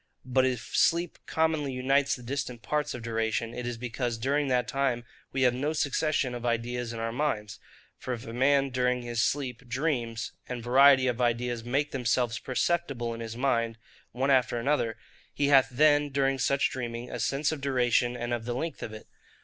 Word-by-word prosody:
But 130 Hz, 0 st, +3 dB
if 125 Hz, -3 st, -4 dB
sleep 170 Hz, +1 st, +2 dB
commonly 160 Hz, -3 st, +1 dB
unites 135 Hz, +2 st, +2 dB
the 125 Hz, -, -12 dB
distant 125 Hz, -2 st, -4 dB
parts 150 Hz, -1 st, -1 dB
of 120 Hz, -, -7 dB
duration, 115 Hz, 0 st, -1 dB
it 125 Hz, 0 st, -4 dB
is 120 Hz, -1 st, -3 dB
because 120 Hz, 0 st, -3 dB
during 140 Hz, +5 st, 0 dB
that 125 Hz, -2 st, +1 dB
time 125 Hz, -2 st, 0 dB, 0.3 s
we 135 Hz, -, 0 dB
have 125 Hz, -1 st, +4 dB
no 145 Hz, +5 st, -1 dB
succession 145 Hz, -3 st, 0 dB
of 120 Hz, -1 st, -6 dB
ideas 120 Hz, 0 st, -1 dB
in 115 Hz, -, -6 dB
our 115 Hz, 0 st, -2 dB
minds. 110 Hz, -6 st, -2 dB, 0.4 s
For -, -, -5 dB
if 115 Hz, +2 st, -10 dB
a 115 Hz, -, -7 dB
man, 135 Hz, +2 st, +3 dB
during 125 Hz, 0 st, +1 dB
his 120 Hz, -1 st, -1 dB
sleep, 130 Hz, -3 st, -1 dB
dreams, 120 Hz, -4 st, -2 dB, 0.2 s
and 125 Hz, -2 st, -4 dB
variety 130 Hz, +2 st, +6 dB
of 125 Hz, -1 st, 0 dB
ideas 120 Hz, -1 st, 0 dB
make 140 Hz, +5 st, 0 dB
themselves 120 Hz, -2 st, 0 dB
perceptible 130 Hz, -3 st, -1 dB
in 115 Hz, -, -7 dB
his 115 Hz, 0 st, -6 dB
mind 115 Hz, -3 st, 0 dB, 0.3 s
one 135 Hz, +3 st, 0 dB
after 130 Hz, -2 st, +3 dB
another, 115 Hz, -3 st, 0 dB, 0.4 s
he 145 Hz, -1 st, +1 dB
hath 135 Hz, -2 st, +6 dB
then, 145 Hz, +2 st, +4 dB
during 135 Hz, -1 st, +1 dB
such 140 Hz, +2 st, +2 dB
dreaming, 120 Hz, -1 st, -5 dB
a 125 Hz, -, -4 dB
sense 140 Hz, +7 st, 0 dB
of 155 Hz, -3 st, -5 dB
duration, 125 Hz, -2 st, +1 dB
and 120 Hz, 0 st, -3 dB
of 115 Hz, -1 st, -3 dB
the 120 Hz, 0 st, -2 dB
length 160 Hz, +5 st, -4 dB
of 110 Hz, -, -5 dB
it. 110 Hz, -, -10 dB
125 Hz, 190 wpm, -28 LUFS, 120-140 Hz, 0.4 s, variety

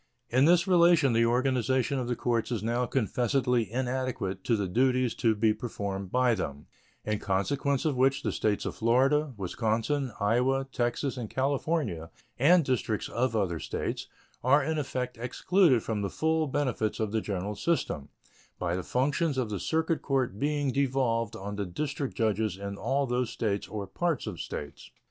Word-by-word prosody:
In 130 Hz, +3 st, +4 dB
this 170 Hz, +1 st, +5 dB
relation 170 Hz, -7 st, +5 dB
the 115 Hz, 0 st, +4 dB
organization 130 Hz, +2 st, +1 dB
of 125 Hz, -, -3 dB
the 120 Hz, -, 0 dB
courts 120 Hz, 0 st, -1 dB
is 110 Hz, -4 st, -2 dB
now 120 Hz, +2 st, 0 dB
confessedly 125 Hz, -2 st, +1 dB
inadequate 125 Hz, -6 st, -2 dB
to 115 Hz, -, +3 dB
the 100 Hz, -3 st, -1 dB
duties 125 Hz, +4 st, +2 dB
to 115 Hz, -2 st, +1 dB
be 110 Hz, +1 st, +3 dB
performed 100 Hz, -5 st, -5 dB
by 125 Hz, -1 st, +3 dB
them, 75 Hz, -8 st, -4 dB, 0.4 s
in 105 Hz, -1 st, -1 dB
consequence 135 Hz, +9 st, 0 dB
of 150 Hz, -4 st, +1 dB
which 135 Hz, +2 st, +2 dB
the -, -, 0 dB
States 105 Hz, -2 st, 0 dB
of -, -, -3 dB
Florida, 135 Hz, +6 st, +2 dB
Wisconsin, 115 Hz, +7 st, -1 dB
Iowa, 125 Hz, +6 st, +2 dB
Texas, 125 Hz, +3 st, -1 dB
and 115 Hz, -4 st, -5 dB
California, 135 Hz, -, -1 dB, 0.3 s
and 165 Hz, +4 st, +5 dB
districts 115 Hz, -4 st, -1 dB
of 125 Hz, -1 st, 0 dB
other 90 Hz, -6 st, 0 dB
States, -, -, -4 dB, 0.4 s
are 140 Hz, +3 st, +4 dB
in 155 Hz, +2 st, -1 dB
effect 125 Hz, -3 st, -3 dB
excluded 130 Hz, -, +2 dB
from 110 Hz, -2 st, -2 dB
the 100 Hz, -, -1 dB
full 160 Hz, +4 st, 0 dB
benefits 130 Hz, -6 st, -1 dB
of 110 Hz, -2 st, -1 dB
the 110 Hz, 0 st, 0 dB
general 100 Hz, 0 st, -3 dB
system 80 Hz, -, -1 dB, 0.5 s
by 90 Hz, -1 st, -1 dB
the 95 Hz, -, -2 dB
functions 140 Hz, -, 0 dB
of 120 Hz, -5 st, -1 dB
the 100 Hz, -, -2 dB
circuit 160 Hz, -, 0 dB
court 130 Hz, -7 st, -1 dB
being 145 Hz, -1 st, 0 dB
devolved 125 Hz, -5 st, 0 dB
on 100 Hz, +1 st, -6 dB
the 100 Hz, -, -1 dB
district 140 Hz, +7 st, -3 dB
judges 110 Hz, -3 st, 0 dB
in 100 Hz, 0 st, -5 dB
all 135 Hz, +6 st, 0 dB
those 125 Hz, -1 st, -1 dB
States 105 Hz, -3 st, -2 dB
or 105 Hz, -2 st, -5 dB
parts 165 Hz, -, -1 dB
of -, -, -5 dB
States. 75 Hz, -, -7 dB
125 Hz, 170 wpm, -29 LUFS, 105-135 Hz, 0.5 s, this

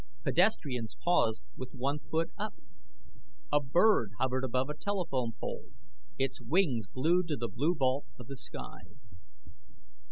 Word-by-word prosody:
Pedestrians 140 Hz, -, +1 dB
paused 115 Hz, -11 st, +3 dB
with 130 Hz, +2 st, -7 dB
one 140 Hz, +3 st, 0 dB
foot 165 Hz, +2 st, -1 dB
up. 215 Hz, +1 st, -4 dB, 1.0 s
A 145 Hz, -, +6 dB
bird 145 Hz, -, +4 dB
hovered 130 Hz, 0 st, +1 dB
above 130 Hz, +1 st, +1 dB
a 150 Hz, -, -3 dB
telephone 150 Hz, -, -1 dB
pole, -, -, -5 dB, 0.5 s
its 135 Hz, 0 st, 0 dB
wings 145 Hz, -, +2 dB
glued 165 Hz, -, +2 dB
to 150 Hz, -3 st, -1 dB
the 120 Hz, 0 st, -2 dB
blue 145 Hz, -, +1 dB
vault 135 Hz, -1 st, +1 dB
of 125 Hz, -, -9 dB
the 135 Hz, -, -7 dB
sky. 130 Hz, -, -6 dB
135 Hz, 135 wpm, -32 LUFS, 125-170 Hz, 1.0 s, A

